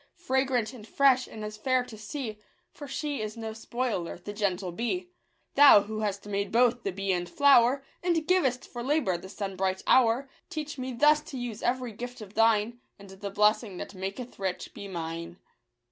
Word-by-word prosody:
Fragrant 260 Hz, -4 st, 0 dB
and 225 Hz, -4 st, -11 dB
fresh, 265 Hz, 0 st, +4 dB
and 215 Hz, -1 st, -7 dB
as 210 Hz, 0 st, -7 dB
fair 255 Hz, +3 st, +1 dB
to 240 Hz, -3 st, -11 dB
see; 215 Hz, 0 st, -6 dB, 0.3 s
For 290 Hz, -, -9 dB
she 285 Hz, -1 st, -3 dB
is 215 Hz, +1 st, -5 dB
no 220 Hz, -1 st, -5 dB
spoiler, 225 Hz, -5 st, -3 dB
the 195 Hz, +4 st, -8 dB
gentle 195 Hz, -3 st, -1 dB
bee! 355 Hz, -, -3 dB, 0.4 s
Thou, 280 Hz, -7 st, +9 dB
who 215 Hz, +1 st, -5 dB
hast 205 Hz, -2 st, -2 dB
made 200 Hz, -1 st, -2 dB
both 245 Hz, +1 st, +3 dB
the 195 Hz, -, -2 dB
bee 195 Hz, +1 st, -2 dB
and 175 Hz, -1 st, -1 dB
flower, 270 Hz, +1 st, +5 dB, 0.2 s
And 340 Hz, -3 st, +1 dB
givest 280 Hz, -9 st, +2 dB
for 240 Hz, -, -7 dB
labour 255 Hz, -, +1 dB
the 190 Hz, +2 st, -10 dB
sunbright 190 Hz, -2 st, -2 dB
hour, 250 Hz, +2 st, +4 dB, 0.2 s
Teach 305 Hz, -5 st, -5 dB
me 255 Hz, 0 st, -3 dB
thus 295 Hz, +5 st, +4 dB
to 275 Hz, -, -7 dB
use 240 Hz, -3 st, -5 dB
every 250 Hz, -1 st, -1 dB
gift 245 Hz, +4 st, -7 dB
of 210 Hz, -2 st, -10 dB
Thine; 225 Hz, +1 st, +3 dB, 0.2 s
And 200 Hz, -1 st, -13 dB
the 195 Hz, +1 st, -6 dB
blessing 210 Hz, 0 st, +2 dB
that -, -, -7 dB
maketh 195 Hz, +6 st, -6 dB
rich 190 Hz, -2 st, -3 dB
be 200 Hz, -, -8 dB
mine. 170 Hz, -1 st, -5 dB
225 Hz, 185 wpm, -28 LUFS, 200-260 Hz, 0.4 s, Thou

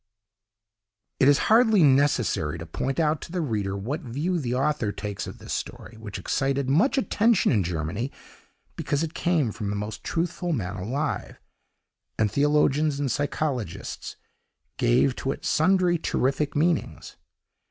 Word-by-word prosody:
"It 135 Hz, -, +5 dB
is 145 Hz, -1 st, +6 dB
hardly 220 Hz, -5 st, +6 dB
necessary 130 Hz, -, +2 dB
to 85 Hz, -, -7 dB
point 130 Hz, -, -3 dB
out 155 Hz, -1 st, +1 dB
to -, -, -9 dB
the 180 Hz, -, -2 dB
reader 105 Hz, -, -2 dB
what 130 Hz, -, -3 dB
view 155 Hz, +7 st, -2 dB
the 125 Hz, -4 st, -2 dB
author 135 Hz, -5 st, 0 dB
takes 105 Hz, -1 st, -5 dB
of -, -, -8 dB
this -, -, -7 dB
story, 115 Hz, -, -6 dB
which 110 Hz, -2 st, -7 dB
excited 135 Hz, -1 st, -1 dB
much 165 Hz, -, +3 dB
attention 230 Hz, -4 st, +3 dB
in 105 Hz, -7 st, +2 dB
Germany, 90 Hz, -, -3 dB, 0.6 s
because 145 Hz, +2 st, -1 dB
it 165 Hz, 0 st, -4 dB
came 160 Hz, -9 st, +1 dB
from 105 Hz, -2 st, -4 dB
the 105 Hz, -, -2 dB
most 105 Hz, +1 st, -5 dB
truthful 170 Hz, +1 st, -2 dB
man 100 Hz, -, -3 dB
alive, 130 Hz, +10 st, -3 dB, 0.8 s
and 105 Hz, -2 st, +1 dB
theologians 150 Hz, 0 st, +2 dB
and 140 Hz, -3 st, 0 dB
psychologists 140 Hz, -, -3 dB, 0.6 s
gave 125 Hz, -, +3 dB
to 135 Hz, -, -2 dB
it -, -, -11 dB
sundry 175 Hz, +1 st, +3 dB
terrific 140 Hz, 0 st, 0 dB
meanings. 165 Hz, +2 st, -1 dB
140 Hz, 145 wpm, -25 LUFS, 110-155 Hz, 0.8 s, is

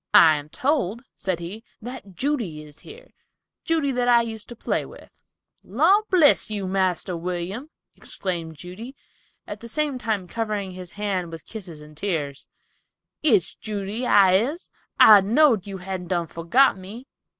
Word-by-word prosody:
"I 155 Hz, -2 st, +8 dB
am 145 Hz, +1 st, -8 dB
told," 245 Hz, -, -1 dB
said 185 Hz, -3 st, -3 dB
he, 190 Hz, +7 st, -7 dB, 0.2 s
"that 235 Hz, -5 st, -9 dB
Judy 230 Hz, -, -2 dB
is 150 Hz, 0 st, -15 dB
here, 475 Hz, +4 st, -14 dB, 0.5 s
Judy, 320 Hz, -4 st, +1 dB
that 245 Hz, -1 st, 0 dB
I 240 Hz, -1 st, +5 dB
used 220 Hz, -2 st, -7 dB
to 240 Hz, -, -8 dB
play -, -, -1 dB
with." -, -, -14 dB, 0.5 s
"Lor' 330 Hz, -, +3 dB
bless 325 Hz, -11 st, +4 dB
you, 205 Hz, -2 st, -3 dB
Marster 185 Hz, -1 st, 0 dB
William," 180 Hz, -, -4 dB, 0.3 s
exclaimed 170 Hz, -4 st, -5 dB
Judy, 195 Hz, -, -9 dB, 0.5 s
at -, -, -7 dB
the 235 Hz, -, -10 dB
same 290 Hz, +1 st, -1 dB
time 215 Hz, -5 st, -2 dB
covering 210 Hz, -2 st, -3 dB
his 180 Hz, -1 st, -10 dB
hand 195 Hz, -5 st, -2 dB
with 165 Hz, -1 st, -9 dB
tears 180 Hz, -9 st, -9 dB
and 150 Hz, 0 st, -14 dB
kisses, 150 Hz, -6 st, -3 dB, 0.7 s
"It's 220 Hz, -, +4 dB
Judy, 210 Hz, +3 st, -4 dB
I 190 Hz, -2 st, +6 dB
is, 280 Hz, -, -3 dB, 0.3 s
I 210 Hz, -2 st, +9 dB
know'd 225 Hz, -, +3 dB
you 195 Hz, -1 st, -5 dB
hadn't 185 Hz, -1 st, -6 dB
done 175 Hz, -1 st, 0 dB
forgot 175 Hz, -, +2 dB
me." 210 Hz, +7 st, -9 dB
200 Hz, 155 wpm, -24 LUFS, 180-245 Hz, 0.7 s, I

